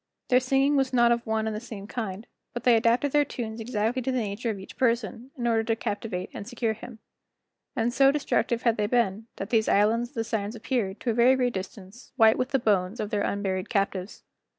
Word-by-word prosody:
Their 250 - +6
singing 270 +2 +2
was 270 -2 +1
not 240 -1 +5
of 235 0 +1
one 220 0 0
and 220 -1 -2
the - - -3
same 215 -4 -8
kind, 215 -2 -5 0.3
but 240 - -4
they 245 -2 +6
adapted 235 +5 +2
their 295 +1 +4
tunes 230 -5 -6
exactly 225 +2 -1
to 260 +2 -1
the 255 - -1
nature 220 +1 -2
of 215 - -2
each 190 - -11
person, 235 -1 0
in 240 - -3
order 225 -1 +2
to 225 0 +1
captivate 205 -4 -4
and 200 - -7
secure 235 -2 -1
him. 235 +2 -10 0.8
And 235 -1 0
so 270 +1 +5
destructive 260 -4 0
had 230 -2 +2
they 210 -1 +1
been, 225 -2 0
that 195 - -6
these 220 -2 +2
islands 225 +4 +3
of 280 - -29
the 225 - 0
Sirens 220 -1 -3
appeared, 225 -4 -2
to 240 - 0
a - - -1
very 240 +3 +5
great 250 -2 0
distance, 190 +4 -8
white 225 -3 +5
with 255 - 0
the 280 - +2
bones 205 -3 +1
of 210 - -3
their 205 - 0
unburied 195 -1 -2
captives. 195 -2 -2
230 Hz, 225 wpm, -26 LUFS, 210-245 Hz, 0.8 s, Their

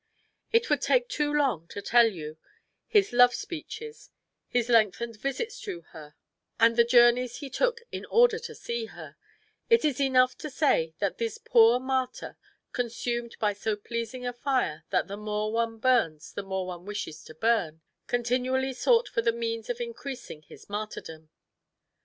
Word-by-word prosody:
It 460 0 +3
would - - +2
take - - +2
too 295 -1 0
long 270 - +1
to 200 - -7
tell 235 +3 +5
you 160 -6 -6 0.5
his 410 - +3
love 245 0 +6
speeches, 435 +7 -7 0.4
his 245 -1 0
lengthened 230 0 +2
visits 275 - -4
to 390 -6 -6
her, 150 -2 -12 0.4
and 230 0 +5
the 235 - +6
journeys 240 +1 +4
he 280 -3 -8
took 475 -2 0
in - - -5
order 470 -1 +4
to 470 - -8
see 470 -1 -4
her; - - -11 0.5
it 460 -7 +5
is 285 -3 0
enough 255 -1 +4
to 305 - -5
say 165 - +1
that 200 -2 -2
this 230 -2 -2
poor 230 +1 +5
martyr, 260 0 -2 0.4
consumed 240 0 -3
by 210 -1 +1
so 210 +2 -2
pleasing 235 +4 -5
a 245 - -2
fire 245 - -1
that - - +1
the 200 0 -6
more 210 0 -2
one 230 0 -1
burns 220 -11 +1
the - - -4
more 190 -1 -3
one 180 -1 -7
wishes 205 -7 -5
to 155 - -12
burn, 170 -6 0 0.3
continually 255 +2 0
sought 470 - +3
for - - -1
the 230 0 +2
means 230 -1 -4
of 245 0 -2
increasing 240 - -7
his - - -15
martyrdom. 200 -7 -6
235 Hz, 165 wpm, -28 LUFS, 210-265 Hz, 0.5 s, love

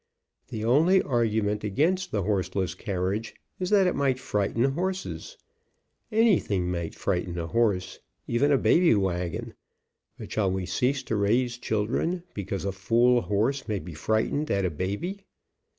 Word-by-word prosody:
The 110 -1 -4
only 165 +10 +4
argument 110 -4 0
against 165 - +1
the 100 -2 -1
horseless 95 -2 -1
carriage 100 +2 -3 0.2
is 180 -1 -2
that 200 -2 +5
it 180 - +2
might 135 -2 +1
frighten 115 -2 -1
horses. 185 +8 -2 0.7
Anything 175 - +2
may 85 -2 -2
frighten 90 -2 -2
a 85 - -2
horse, 100 -1 0 0.3
even 135 +5 +2
a 140 - +5
baby 170 -1 +4
wagon, 90 -4 -2 0.6
but - - -9
shall 100 -3 +1
we 95 0 -2
cease 125 +9 0
to 115 - -2
raise 120 +4 +1
children 120 - -1
because 100 -1 -4
a 100 - 0
fool 120 +5 +3
horse 115 +8 0
may 105 -2 -1
be 85 -1 -7
frightened 110 - 0
at 100 -1 +1
a 90 - 0
baby 100 - -3
110 Hz, 150 wpm, -27 LUFS, 95-135 Hz, 0.7 s, that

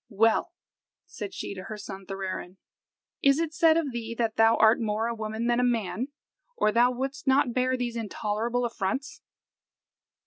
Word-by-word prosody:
"Well," 225 - +2 0.5
said 210 - -7
she - - -5
to 185 -1 -8
her 215 - -6
son 195 -2 -8
Thorarin, 190 -1 -5 0.6
"is 275 0 +5
it 325 -1 -1
said 325 0 +5
of 305 -5 0
thee 230 -1 -5
that 225 -2 0
thou 225 0 +5
art 220 +1 +5
more 220 -1 -1
a 235 - -1
woman 220 0 -4
than 240 0 +2
a - - +2
man, 235 0 0 0.5
or 215 - +3
thou 240 +3 +4
wouldst 270 +3 -4
not 265 -2 +3
bear 255 +1 +1
these 240 -1 -3
intolerable 225 +2 -1
affronts." 230 +4 -3
230 Hz, 170 wpm, -27 LUFS, 215-255 Hz, 0.6 s, is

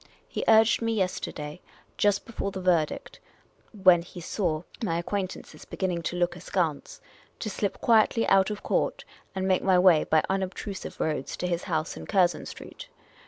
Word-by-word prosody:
He - - -4
urged 220 +1 +5
me 230 0 0
yesterday, 180 -5 -3 0.3
just 205 -1 +2
before 225 -3 -4
the 190 - -6
verdict 175 -4 0 0.6
(when 180 -2 +7
he 175 - -11
saw 170 -2 -2 0.2
my 165 -6 0
acquaintances 185 +2 -4
beginning 180 -3 -2
to - - -6
look 175 0 0
askance), 170 -4 -2 0.4
to 215 - -4
slip 200 0 -2
quietly 230 0 +4
out 195 0 +4
of 210 -1 -5
court, - - -1 0.3
and 190 0 -1
make 185 -1 +3
my 190 -2 +4
way 180 -4 +6
by 155 -1 +2
unobtrusive 195 +1 -4
roads 150 -4 -2
to - - -3
his 175 -1 -2
house 155 0 -2
in - - -9
Curzon 185 -4 +2
Street. - - -10
185 Hz, 165 wpm, -27 LUFS, 170-200 Hz, 0.6 s, when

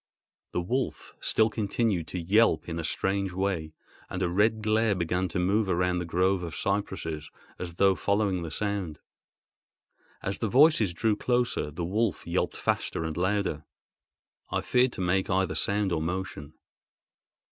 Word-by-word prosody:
The 90 - 0
wolf 125 +9 -3
still 110 0 +2
continued 105 -5 0
to 90 - -4
yelp 95 -1 +3
in 85 -1 -3
a - - -3
strange 95 +3 -1
way, 90 -5 -2 0.3
and 95 0 -2
a 90 - +1
red 105 +4 +2
glare 110 -1 +2
began 90 +1 0
to 85 - -4
move 100 +4 +2
round 90 0 +1
the - - -3
grove 90 +3 +1
of 85 -1 -5
cypresses, 90 -6 -2 0.3
as 85 -2 -6
though 95 +1 +4
following 100 -2 0
the 85 - -4
sound. 100 -3 -2 1.3
As 95 - -3
the 110 - -1
voices 130 - +5
drew 105 +5 +1
closer, 120 -7 0
the 80 +3 -4
wolf 105 +3 0
yelped - - -1
faster - - -1
and 80 -1 -3
louder. 95 -3 0 0.9
I - - -1
feared 125 0 +2
to - - -5
make 95 +1 +1
either 95 0 +1
sound 100 -1 0
or 80 -2 0
motion. 80 -4 -4
95 Hz, 160 wpm, -28 LUFS, 85-105 Hz, 1.3 s, voices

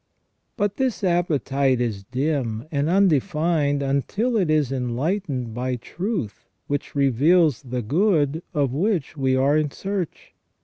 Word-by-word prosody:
{ - - -49
But 205 -2 -1
this 260 -6 -1
appetite 140 -7 +1
is 110 -5 -2
dim 130 -3 -2
and 145 +1 0
undefined 160 -5 +2
until 200 - 0
it 190 -7 +1
is 150 -4 +2
enlightened 130 - -2
by 125 +2 -2
truth 170 - -5 0.2
which 145 0 -3
reveals 145 +3 +3
the 125 -2 -4
good 155 - +1
of 140 -5 0
which 170 -1 0
we 130 -2 +1
are 135 +3 +3
in 155 -1 +1
search. 195 +2 -5
145 Hz, 135 wpm, -23 LUFS, 130-175 Hz, 0.2 s, reveals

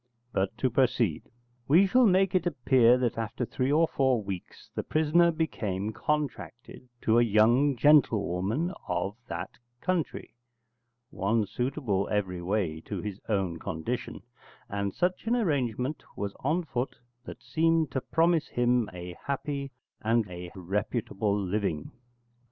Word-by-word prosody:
But 95 0 -1
to 130 - +1
proceed. 120 - +1 0.4
We 170 +8 +6
shall 250 +5 +5
make 190 -1 +3
it 180 -2 +2
appear 125 -5 +4
that 120 -2 -1
after 120 +2 -3
three 130 +3 -1
or 160 +2 +4
four 130 -7 +1
weeks 95 -3 -8
the - - -2
prisoner 160 +2 +3
became 110 - -2
contracted 130 -3 -4
to 115 +1 +4
a - - +5
young 120 +5 +4
gentlewoman 120 - +3
of 90 +3 -1
that - - -6 0.2
country, 180 -1 -2 0.8
one 110 -5 +1
suitable 120 -3 -1
every 95 -4 -1
way 85 -4 -1
to 100 - -4
his 100 +1 -6
own 95 -6 0
condition, 100 +7 -4 0.4
and 100 0 -2
such 180 +4 -1
an 235 - +3
arrangement 140 - -1
was 100 -1 -3
on 160 +6 0
foot 130 -4 -3 0.3
that - - -10
seemed 165 -2 +2
to 130 - -1
promise 165 +1 +2
him 120 -2 +1
a 90 -1 -8
happy 140 0 -3 0.3
and 115 -1 +2
a 90 0 -7
reputable 105 +2 -1
living. 95 -5 -2
120 Hz, 135 wpm, -28 LUFS, 100-150 Hz, 0.8 s, We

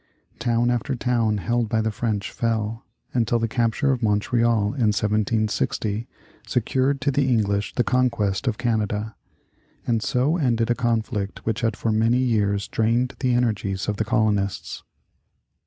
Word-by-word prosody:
Town 120 0 +1
after 120 +2 -1
town 115 -3 +1
held 120 +2 0
by 110 -1 +1
the 110 0 0
French 105 -2 -2
fell, 115 -1 -2 0.3
until 120 -1 +2
the 115 0 0
capture 120 +4 +1
of 130 -2 -1
Montreal, 110 0 +2
in 125 -6 +1
1760, 105 +1 0 0.4
secured 130 +3 +1
to 140 +1 +1
the 135 0 +1
English 100 -4 0
the 125 - +2
conquest 120 -4 0
of 115 -4 0
Canada, 110 -2 -1 0.7
and 115 -2 +1
so 130 +9 +1
ended 120 -6 +1
a - - +5
conflict 110 -4 -2
which 115 +2 -1
had 115 -1 0
for 115 - -1
many 115 +3 +3
years 105 -5 +1
drained 120 +3 +1
the 125 -2 +1
energies 105 -5 -1
of 105 -1 -1
the 110 - +1
colonists. 105 -4 0
115 Hz, 150 wpm, -23 LUFS, 105-120 Hz, 0.7 s, a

